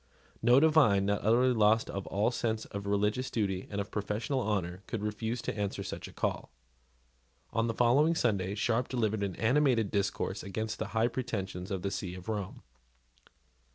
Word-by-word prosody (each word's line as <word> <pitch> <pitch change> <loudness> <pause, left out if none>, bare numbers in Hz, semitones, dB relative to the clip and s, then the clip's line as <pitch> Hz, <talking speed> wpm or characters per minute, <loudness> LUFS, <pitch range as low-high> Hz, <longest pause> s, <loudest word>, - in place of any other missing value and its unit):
No 120 +3 +6
divine, 140 -11 +5
not 100 0 0
utterly 125 +4 +4
lost 110 0 +4
to - - -8
all 100 +3 0
sense 110 -2 -2
of 100 0 -6
religious 105 +5 0
duty 95 -4 -1
and 100 - -3
of 100 - -4
professional 105 +6 -2
honour, 95 -5 -2
could 110 -3 -4
refuse 110 +2 -3
to - - -3
answer 105 -2 -2
such - - -6
a - - -11
call. - - -2 1.0
On 115 +1 +1
the 115 - -2
following 140 +8 +4
Sunday 100 - 0
Sharp 115 +4 +1
delivered 110 -4 0
an 100 -2 -2
animated 120 -3 +2
discourse 100 -2 -1
against 110 +3 -4
the - - -2
high 115 +1 +4
pretensions 95 -7 -4
of 95 -3 -3
the 100 - -1
see 90 -1 -4
of 90 +3 -9
Rome. 100 -3 -4
110 Hz, 175 wpm, -31 LUFS, 100-120 Hz, 1.0 s, No